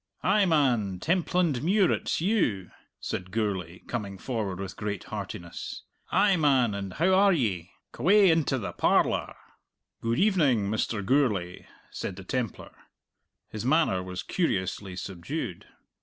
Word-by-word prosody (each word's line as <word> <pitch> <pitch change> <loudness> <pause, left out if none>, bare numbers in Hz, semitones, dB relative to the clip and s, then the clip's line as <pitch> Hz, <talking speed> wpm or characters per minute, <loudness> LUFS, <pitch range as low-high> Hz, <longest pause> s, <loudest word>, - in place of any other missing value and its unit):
"Ay, 200 +1 +3
man, 125 - +2
Templandmuir, 175 - +2
it's - - -1
you!" 160 - 0 0.3
said 90 0 -4
Gourlay, 95 -5 -2
coming 100 -5 -4
forward 105 -5 -3
with 95 -2 -6
great 105 -2 -4
heartiness. 100 -4 -7 0.3
"Ay, 200 -1 +4
man, 135 -8 +3
and 100 -2 -5
how 185 +4 +2
are 200 +1 +5
ye? 100 - 0 0.2
C'way 190 - +5
into 160 -4 +1
the 95 -7 -4
parlour!" - - +1 0.7
"Good 115 +1 0
evening, 145 - +3
Mr. 110 -2 -1
Gourlay," 105 -9 0 0.2
said 95 - -5
the 95 - -9
Templar. 115 +1 -4 0.8
His 110 - -6
manner 135 - +2
was 90 -1 -6
curiously 95 - -2
subdued. 95 - -5
115 Hz, 125 wpm, -27 LUFS, -, 0.8 s, are